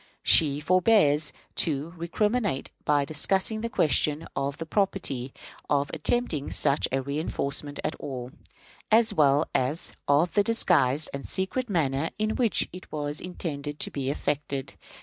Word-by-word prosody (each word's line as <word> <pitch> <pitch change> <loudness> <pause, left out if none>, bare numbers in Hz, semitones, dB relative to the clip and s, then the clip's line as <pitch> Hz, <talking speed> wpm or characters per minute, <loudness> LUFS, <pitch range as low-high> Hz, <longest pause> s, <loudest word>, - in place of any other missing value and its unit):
She 145 -3 +5
forbears 160 -3 +3 0.3
to 155 +1 -1
recriminate 205 - -1
by 145 -1 +2
discussing 190 +8 0
the 230 - -3
question 155 -3 +1
of 140 +1 -2
the 165 - -5
propriety 160 - -1 0.4
of 140 -1 +1
attempting 175 - 0
such 140 - +2
a 135 0 -2
reënforcement 145 0 -2
at - - -1
all, 125 -3 -6 0.6
as 225 0 +5
well 145 -3 +3
as 140 +6 +1
of 150 +5 +3
the 205 - +4
disguised 160 - +3
and 140 0 -5
secret 225 +6 -2
manner 155 -4 0
in 215 +1 0
which 235 -6 +1
it 180 - -11
was 150 0 -3
intended 150 -5 -5
to - - 0
be 135 -2 -3
effected. 140 -1 -3
150 Hz, 140 wpm, -26 LUFS, 140-190 Hz, 0.6 s, She